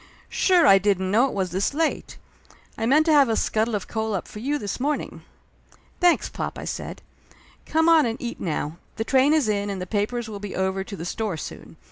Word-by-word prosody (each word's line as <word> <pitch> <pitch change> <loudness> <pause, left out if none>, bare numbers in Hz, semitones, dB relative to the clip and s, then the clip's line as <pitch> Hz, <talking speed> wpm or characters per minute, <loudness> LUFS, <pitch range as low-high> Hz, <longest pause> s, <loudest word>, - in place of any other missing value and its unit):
"Sure 360 -4 +3
I 195 -8 +7
didn't 190 -1 0
know 235 +6 +4
it - - -6
was 190 -3 -1
this 195 +9 -1
late! 320 0 -1 0.6
I 225 - -2
meant 300 +5 +4
to 320 - +4
have 280 -4 +5
a 225 - +1
scuttle 220 +1 0
of 200 - -4
coal 220 -2 -2
up 185 - -4
for 210 - -9
you 285 +6 -1
this 205 -3 -4
morning 295 +3 -2 0.4
!" - - -31
"Thanks, 350 -1 +4
pop," - - -5
I - - -6
said. - - -6 0.6
"Come 320 +1 +2
on 325 -5 +6
and 225 0 -4
eat 240 -1 -5
now. 160 -2 -3 0.2
The 225 - -2
train 265 +4 +3
is 310 -6 +3
in 205 -1 0
and 195 -1 -4
the 180 - -4
papers 220 +5 -2
will 210 -2 -7
be 205 -1 -6
over 190 0 -1
to 200 - -8
the 170 - -7
store 205 -1 -3
soon. - - -9
220 Hz, 225 wpm, -24 LUFS, 195-275 Hz, 0.6 s, I